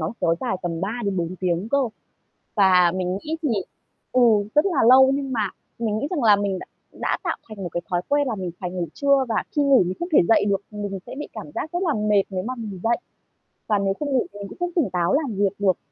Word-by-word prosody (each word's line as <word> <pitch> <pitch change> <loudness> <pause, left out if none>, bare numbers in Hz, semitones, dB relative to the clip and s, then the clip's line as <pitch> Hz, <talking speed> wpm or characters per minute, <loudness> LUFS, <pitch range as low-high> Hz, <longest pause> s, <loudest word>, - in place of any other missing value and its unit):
nó 160 +5 -2
kéo 165 - +3
dài 240 -7 -1
tầm 170 -2 -3
3 195 +5 -2
đến 200 -2 -1
4 175 +1 -2
tiếng 180 +2 -1
cơ. 280 - +2 0.8
Và 185 -4 +5
mình 185 0 -1
nghĩ 315 +6 -3
thì, 300 - +1 0.6
ừ, 255 - +3 0.3
rất 300 - +4
là 350 -7 0
lâu 265 +1 +8
nhưng 275 -1 -3
mà 215 -5 0 0.3
mình 220 -2 -1
nghĩ 255 - -2
rằng 325 -7 -1
là 215 -3 +6
mình 200 -2 -1
đ - - -7 0.4
đã - - 0
tạo - - -1
thành 215 - -9
một - - -2
cái 175 - -1
thói 175 -1 0
quen 285 0 +2
là 230 - -1
mình 185 -3 -4
phải 180 - -3
ngủ 180 -1 -3
trưa 280 -1 +3
và 225 - -1 0.2
khi 295 - +4
ngủ 275 -5 +5
mình 180 - -2
không 345 - -3
thể - - +6
dậy 225 - +5
được, 195 -1 +1
mình 205 -2 -4
sẽ - - -7
bị 295 - -5
cảm - - -8
giác 315 - -4
rất 350 +1 -1
là 325 -6 +1
mệt 210 -2 +3
nếu 185 -1 -2
mà 255 +3 -3
mình 205 -5 -6
dậy. 235 +1 +2 0.7
Và 210 -2 +2
nếu 195 -1 +1
không 290 +8 -4
ngủ 260 -2 +2
thì 205 - -10
mình 200 - -6
cũng - - -12
không 355 0 -1
tỉnh 320 - +2
táo 175 -1 +1
làm 280 -7 0
việc 200 0 +2
được. 190 -3 +2
210 Hz, 265 wpm, -23 LUFS, 185-270 Hz, 0.8 s, lâu